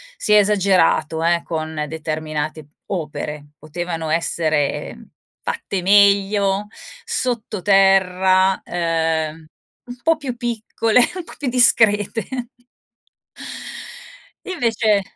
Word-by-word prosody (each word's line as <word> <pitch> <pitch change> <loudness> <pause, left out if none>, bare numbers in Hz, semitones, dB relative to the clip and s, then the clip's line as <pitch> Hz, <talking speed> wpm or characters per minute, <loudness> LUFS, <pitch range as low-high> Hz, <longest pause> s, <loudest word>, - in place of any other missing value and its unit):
si - - -2
è 210 - +8
esagerato, 190 -6 +2
eh, 170 0 +2
con 155 -1 -4
determinate 155 -1 -4 0.2
opere. 150 -4 -5
Potevano 165 +2 -5
essere 155 -2 -1 0.4
fatte 460 - -3
meglio, 200 0 +3 0.4
sottoterra, 195 -4 +2
ehm, 165 -2 -2 0.4
un 245 - -8
po' 325 +3 +2
più 270 -5 -5
piccole, 230 -1 0 0.2
un 365 - -5
po' - - -12
più 285 - -4
discrete 225 -4 +4 2.2
e - - -5
invece, 225 - +1
190 Hz, 90 wpm, -20 LUFS, 160-215 Hz, 2.2 s, è